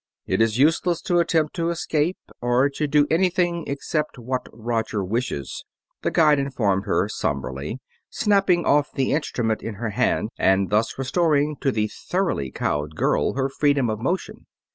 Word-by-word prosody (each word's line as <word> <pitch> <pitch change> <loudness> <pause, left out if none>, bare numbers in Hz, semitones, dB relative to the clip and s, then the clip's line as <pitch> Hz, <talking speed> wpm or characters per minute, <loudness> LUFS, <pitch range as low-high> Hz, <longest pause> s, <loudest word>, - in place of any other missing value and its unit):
"It - - 0
is 115 0 +2
useless 165 +4 +3
to 175 -1 +2
attempt 160 -3 +1
to 170 0 0
escape, 165 0 0 0.2
or 120 +3 +3
to 150 +2 -2
do 145 0 +4
anything 175 -1 +1
except 150 +2 -2
what 125 +1 -4
Roger 115 -3 -2
wishes," 105 - -3 0.4
the - - 0
guide 150 -3 +4
informed 105 -8 0
her - - +1
somberly, 70 - -3 0.3
snapping 195 -5 +2
off 145 0 +3
the 135 -1 0
instrument 120 -7 -1
in 115 - -5
her 110 +1 -3
hand 110 -1 +1
and 95 0 +2
thus 110 +2 +1
restoring 150 +2 +1
to 135 - +2
the 110 -3 0
thoroughly 175 - -2
cowed 75 +3 -2
girl - - +1
her 135 0 0
freedom 140 -3 +1
of 110 - -4
motion. 175 +11 -3
135 Hz, 160 wpm, -23 LUFS, 110-160 Hz, 0.4 s, do